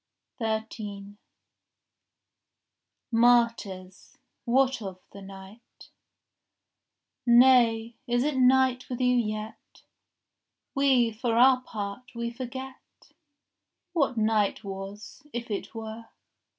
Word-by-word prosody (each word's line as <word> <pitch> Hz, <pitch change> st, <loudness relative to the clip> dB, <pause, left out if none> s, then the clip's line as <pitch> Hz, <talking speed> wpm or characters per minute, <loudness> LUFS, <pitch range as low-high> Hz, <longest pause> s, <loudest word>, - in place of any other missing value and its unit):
13 215 Hz, -2 st, -5 dB, 1.9 s
Martyrs, 230 Hz, -6 st, +1 dB, 0.3 s
what 260 Hz, +1 st, +2 dB
of 190 Hz, -3 st, -7 dB
the 200 Hz, -, -11 dB
night?— 195 Hz, +3 st, -14 dB, 1.4 s
Nay, 235 Hz, -2 st, +5 dB
is 245 Hz, +1 st, +1 dB
it 295 Hz, 0 st, -1 dB
night 260 Hz, 0 st, +3 dB
with 250 Hz, -, -4 dB
you 250 Hz, -1 st, +3 dB
yet? 215 Hz, -2 st, -4 dB, 0.9 s
We, 265 Hz, -4 st, +3 dB
for 230 Hz, +1 st, -2 dB
our 255 Hz, +1 st, +6 dB
part, 215 Hz, +1 st, -7 dB
we 235 Hz, 0 st, -3 dB
forget 260 Hz, +2 st, -9 dB, 0.8 s
What 280 Hz, -7 st, +1 dB
night 215 Hz, -1 st, +1 dB
was, 195 Hz, +1 st, -8 dB
if 235 Hz, -1 st, -5 dB
it 205 Hz, -, -5 dB
were. 225 Hz, 0 st, -7 dB
235 Hz, 90 wpm, -27 LUFS, 210-250 Hz, 1.9 s, our